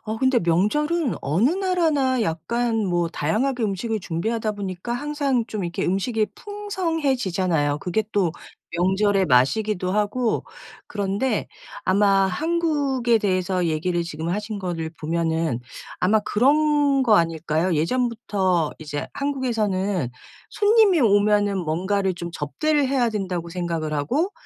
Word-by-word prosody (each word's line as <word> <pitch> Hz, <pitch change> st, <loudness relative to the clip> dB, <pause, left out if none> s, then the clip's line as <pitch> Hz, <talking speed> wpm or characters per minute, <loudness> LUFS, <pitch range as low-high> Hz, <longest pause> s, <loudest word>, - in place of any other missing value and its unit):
어 220 Hz, 0 st, -3 dB
근데 260 Hz, -1 st, +3 dB
명절은 255 Hz, -, +1 dB
어느 175 Hz, -, +2 dB
나라나 325 Hz, -9 st, +1 dB
약간 230 Hz, +7 st, -1 dB
뭐 175 Hz, -1 st, 0 dB
다양하게 230 Hz, -, -1 dB
음식을 215 Hz, +2 st, -1 dB
준비하다 215 Hz, +6 st, -2 dB
보니까 200 Hz, +2 st, -5 dB
항상 280 Hz, -2 st, -1 dB
좀 210 Hz, -5 st, -4 dB
이렇게 170 Hz, 0 st, -3 dB
음식이 210 Hz, +4 st, 0 dB
풍성해지잖아요. 270 Hz, -, -1 dB
그게 180 Hz, +7 st, -1 dB
또 185 Hz, -5 st, +1 dB, 0.4 s
명절의 190 Hz, +2 st, +2 dB
맛이기도 180 Hz, -, +2 dB
하고. 210 Hz, +4 st, 0 dB, 0.4 s
그런데 205 Hz, +4 st, -1 dB, 0.4 s
아마 195 Hz, 0 st, +3 dB
한국에 280 Hz, -, +1 dB
대해서 185 Hz, -2 st, 0 dB
얘기를 170 Hz, +2 st, 0 dB
지금 160 Hz, 0 st, -5 dB
하신 210 Hz, +3 st, -3 dB
거를 170 Hz, -4 st, -3 dB
보면은 160 Hz, -4 st, -1 dB, 0.4 s
아마 215 Hz, +4 st, +3 dB
그런 285 Hz, +5 st, +3 dB
거 225 Hz, -5 st, +5 dB
아닐까요? 165 Hz, 0 st, 0 dB
예전부터 190 Hz, -3 st, 0 dB
이제 150 Hz, -2 st, -5 dB
한국에서는 210 Hz, -, -1 dB, 0.4 s
'손님이 415 Hz, -4 st, +4 dB
오면은 205 Hz, -2 st, +3 dB
뭔가를 190 Hz, +3 st, 0 dB
좀 170 Hz, 0 st, -6 dB
접대를 290 Hz, -, 0 dB
해야 260 Hz, -3 st, +2 dB
된다.'고 185 Hz, -5 st, -3 dB
생각을 170 Hz, -3 st, -3 dB
하고 265 Hz, -, 0 dB
205 Hz, 300 characters per minute, -23 LUFS, 175-260 Hz, 0.4 s, 거